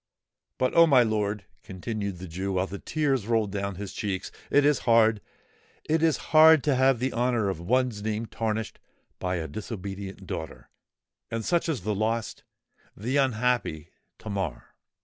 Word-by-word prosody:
But, 130 - +1
oh! 170 0 +7
my 130 -5 +6
lord," 105 -2 -1 0.2
continued 100 0 -5
the 90 +1 -8
Jew, 95 +4 -3
while 95 0 +1
tears 135 +4 -1
rolled 110 -3 +1
down 100 -1 -3
his 100 +1 -7
cheeks, 100 -3 -3 0.2
"it 145 0 +4
is 145 -2 +3
hard—it 115 +7 0
is 160 -2 +3 0.2
hard 155 -1 +8
to 145 - +2
have 130 0 +4
the 130 +3 -2
honour 120 -4 +1
of 95 - -3
one's 120 +3 0
name 110 +1 -2
tarnished 110 -1 -3 0.4
by 90 0 -1
a 80 -2 -3
disobedient 95 - -7
daughter:—and 80 - -8
such 170 -1 +1
is 145 -10 -1
the 105 +3 -1
lost—the 110 +2 -4
unhappy 125 - 0 0.3
Tamar!" 95 - -5
110 Hz, 145 wpm, -27 LUFS, 95-125 Hz, 0.4 s, hard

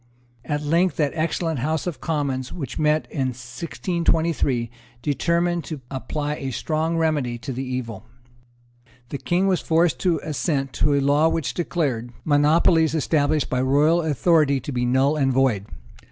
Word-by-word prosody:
At 150 -1 -2
length 170 +5 +2
that 145 -3 +1
excellent 160 -1 -1
House 155 +4 -1
of 165 -8 -5
Commons 140 -5 -2
which 140 -6 -6
met 155 0 +2
in 135 -4 -1
1623 155 -1 -1 0.3
determined 170 +3 0
to 155 -5 -6
apply 145 +2 -3
a 135 - -4
strong 160 +6 -1
remedy 150 -7 0
to 125 +3 -6
the 130 +2 -4
evil. 125 -5 -5 1.0
The 140 - -5
King 180 +2 +1
was 190 -2 +1
forced 160 -4 +2
to 180 - +2
give - - -9
his 155 - -4
assent 135 -2 -1
to 145 0 +2
a 140 - +2
law 145 +3 +3
which 165 -5 -2
declared 135 -9 -2
monopolies 160 +2 +3
established 150 -1 +1
by 125 -1 +1
royal 145 +6 +3
authority 155 -2 +2
to 145 - -6
be 125 -1 -1
null 130 +4 +2
and 135 -2 +2
void. 125 -6 +1
150 Hz, 160 wpm, -23 LUFS, 130-165 Hz, 1.0 s, law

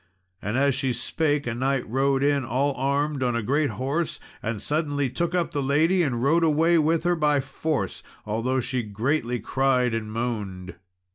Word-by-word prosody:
And 105 +5 -2
as 140 0 +3
she 130 -1 0
spake, 145 +4 -1
a 120 - -2
knight 130 +2 -1
rode 135 +3 +1
in 140 -1 +2
all 135 +4 0
armed, 140 +2 0
on 125 -2 +1
a 115 - -1
great 145 +6 +1
horse, 135 - -2 0.2
and 110 -1 -3
suddenly 145 +1 -1
took 170 +6 -1
up 175 -1 0
the 145 - -1
lady 155 +7 +3
and 125 -7 0
rode 165 +5 +3
away 165 +2 +4
with 160 +1 +2
her 175 0 +2
by 150 -3 +2
force, 145 +2 -3 0.2
although 115 +5 0
she 125 +1 -2
greatly 120 +4 -1
cried 130 -2 +1
and 110 -1 -3
moaned. 105 -6 -4
135 Hz, 180 wpm, -25 LUFS, 120-150 Hz, 0.2 s, away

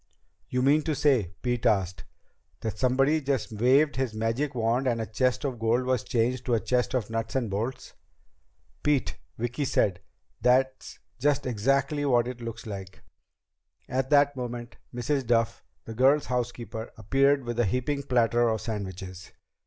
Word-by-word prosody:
"You 125 0 0
mean 145 +3 +4
to 155 -2 0
say," 120 - +2
Pete 120 -1 0
asked, 95 -6 0 0.6
"that 110 -2 -4
somebody 135 +5 +3
just 135 -5 -1
waved 130 +6 +3
his 130 -4 -1
magic 115 +6 -1
wand 120 +3 +1
and 120 -2 +1
a 110 - -2
chest 125 +5 0
of 130 -4 -3
gold 115 +3 +1
was 130 -3 +1
changed 125 +1 0
to 120 - +3
a - - +2
chest 125 +3 0
of 115 -3 -2
nuts 115 +1 -3
and 120 -6 0
bolts?" 120 +6 -4 0.9
"Pete," 145 -3 +1 0.2
Vicki 120 +5 -2
said, 100 -8 +1 0.4
"that's 130 +1 +1 0.2
just 145 +1 +1
exactly 135 +5 +1
what 120 -4 +3
it 125 -1 -6
looks 115 -1 -6
like." 95 -3 -8 0.8
At 130 0 -1
that 145 -1 +4
moment 120 -1 -6
Mrs. 130 +3 -1
Duff, 115 -1 +1 0.2
the 115 - -7
girls' 135 +5 +4
housekeeper, 120 -2 -3
appeared 135 +6 +2
with 120 0 -4
a 120 - +4
heaping 125 +7 -1
platter 120 -2 +2
of 110 -1 0
sandwiches. 95 -4 -6
125 Hz, 160 wpm, -27 LUFS, 115-135 Hz, 0.9 s, mean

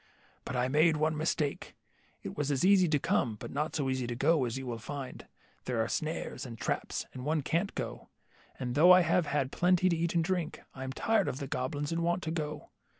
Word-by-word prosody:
But - - -4
I 125 0 +1
made 155 +4 +4
one 155 +1 +1
mistake. 150 -2 -2 0.5
It - - -6
was 145 -1 -1 0.2
easy 190 -2 +6
to 150 - +3
come, 120 -4 0
but - - -8
not 150 +3 -2
so 145 -4 0
easy 130 -2 -1
to 120 - -3
go, 145 +2 +3
as 120 +1 -3
you 135 - -5
will 120 -2 -4
find. 135 +2 -7 0.4
There 125 -3 -1
are 110 - +1
snares 155 +1 -3
and 120 -4 -7
traps, - - -2
and 125 - -7
one 155 +1 0
can't 170 +8 -1
go, - - -5 0.5
and 125 -2 -3
though 160 +7 +7
I 180 0 +8
have 170 -1 +2
had 140 -2 0
plenty 180 +1 +3
to 170 - +2
eat 170 +1 -1
and 165 - +3
drink, 175 -2 -2
I 130 - -7
am 130 - -4
tired 220 +7 +1
of - - -2
the 140 - -4
goblins, 145 +3 -3
and 165 0 0
want 175 +2 0
to 160 - -2
go. 155 -2 -4
150 Hz, 225 wpm, -31 LUFS, 130-170 Hz, 0.5 s, I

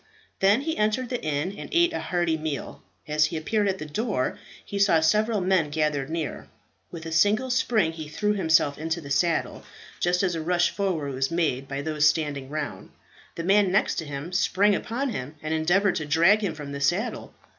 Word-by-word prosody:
Then 200 +6 +4
he 320 +2 -3
entered 215 +4 0
the 245 - -3
inn 155 +5 -1
and - - -8
ate 345 0 +3
a - - -2
hearty 175 -2 0
meal. 155 -2 -5 0.3
As 150 0 +3
he 160 +2 -3
appeared 205 +6 0
at 190 -1 0
the 155 - -6
door, 190 - -2 0.3
he 200 - -4
saw 195 -5 +4
several 210 +6 +2
men 180 -4 +2
gathered 150 -2 -1
near. 160 -2 -4 0.4
With 165 -2 -9
a 165 - -5
single 210 +10 +2
spring 230 -9 +2
he 160 -2 -8
threw 210 +7 0
himself 160 -7 +2
into 160 +2 -2
the 140 -4 -9
saddle, 165 +4 0 0.4
just 180 +2 +1
as 185 -2 +1
a 165 - -3
rush 175 +2 +2
forward 165 -9 -2
was 135 +1 0
made 155 -6 -1
by 140 +1 -4
those 155 -1 +2
standing 145 -4 -3
round. 145 -11 -5 0.5
The 165 - -4
man 195 +1 +3
next 195 - +2
to 160 - -2
him 145 +5 -6
sprang 200 +2 +3
upon 240 +7 -2
him, 140 - -6
and 155 +1 -2
endeavoured 175 +5 +2
to 150 - -4
drag 170 +8 +4
him 175 -6 -1
from 145 -2 -7
the 140 0 -5
saddle. 175 - -1
165 Hz, 200 wpm, -25 LUFS, 150-200 Hz, 0.5 s, Then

